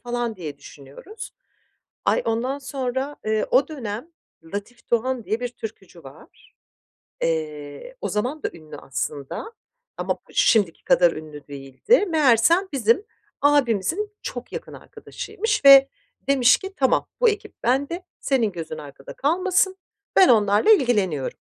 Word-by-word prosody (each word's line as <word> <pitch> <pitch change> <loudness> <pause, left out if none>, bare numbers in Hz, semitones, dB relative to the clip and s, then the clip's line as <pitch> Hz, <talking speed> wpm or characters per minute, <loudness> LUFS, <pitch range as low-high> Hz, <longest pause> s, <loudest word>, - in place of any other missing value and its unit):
falan 240 -2 -3
diye 150 -6 -7
düşünüyoruz. 145 - -11 0.7
Ay, - - +2
ondan 240 +5 -1
sonra, 265 +1 -3
eee, 215 0 +1
o 265 +2 +4
dönem 240 -3 -6 0.5
Latif 220 +4 -7
Doğan 240 0 0
diye 220 +3 -2
bir 245 - -2
türkücü 195 -7 -10
var. 135 0 -16 0.7
Eee, 155 - -3
o - - -1
zaman 250 +8 -2
da - - 0
ünlü 155 -2 -12
aslında 140 - -5 0.5
ama - - -1
p - - -23
şimdiki 200 -8 +2
kadar 175 -1 +4
ünlü 155 -2 -10
değildi. 140 - +1
Meğersem, 310 - +4
bizim 240 - +2 0.4
abimizin 290 - +2
çok - - -7
yakın - - -7
arkadaşıymış 430 -4 -4
ve 275 0 +9 0.4
demiş 260 -3 +5
ki, 385 0 -8
"Tamam, 265 -2 +2
bu 485 - +5
ekip 425 -1 -4
bende, 285 +9 0 0.2
senin 235 -7 +1
gözün 160 -2 -6
arkada 140 -2 -10
kalmasın, 370 +5 +1 0.4
ben 380 - +7
onlarla 210 - +4
ilgileniyorum." 205 - +1
240 Hz, 130 wpm, -23 LUFS, 180-290 Hz, 0.7 s, ve